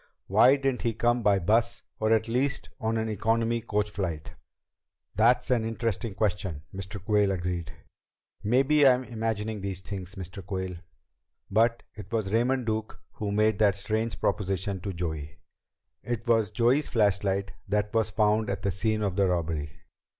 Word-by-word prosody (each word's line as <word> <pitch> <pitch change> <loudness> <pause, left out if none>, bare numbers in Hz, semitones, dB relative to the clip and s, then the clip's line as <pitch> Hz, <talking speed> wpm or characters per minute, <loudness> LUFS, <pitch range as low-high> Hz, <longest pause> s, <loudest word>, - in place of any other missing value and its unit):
Why 115 +7 +6
didn't 135 -2 -1
he 115 - 0
come 120 +2 +1
by 105 -3 +4
bus, 110 +6 +1 0.2
or 110 0 +1
at 110 0 +3
least 135 +5 -1
on 115 -2 0
an 110 0 -1
economy 115 +2 0
coach 105 -2 -1
flight?" 90 -7 -4 0.8
"That's 120 +4 +3
an 120 -3 +3
interesting 115 -1 -2
question," 95 -6 -1
Mr. 95 +2 -6
Quayle 105 -1 +3
agreed. 90 -3 -2 0.7
"Maybe 135 +6 +4
I'm 130 0 +4
imagining 110 -3 -3
things, 95 0 -6
Mr. 95 0 -7
Quayle. 95 -2 -4 0.7
But 115 +3 +2
it 105 +1 -11
was 110 -3 -1
Raymond 125 +2 +2
Duke 110 -1 -3
who 105 -1 -4
made 110 0 +2
that 100 -3 +4
strange 110 +3 -2
proposition 95 0 -1
to 100 - -3
Joey. 80 -4 -5 0.6
It 120 -1 -4
was 115 -3 +3
Joey's 120 +7 +2
flashlight 100 -3 +1 0.2
that 105 +1 0
was 110 -1 +2
found 105 0 +2
at 100 - -3
the 100 - +1
scene 110 +3 0
of 100 -3 -1
the 100 -1 +3
robbery. 80 -4 -1
105 Hz, 155 wpm, -28 LUFS, 95-115 Hz, 0.8 s, Why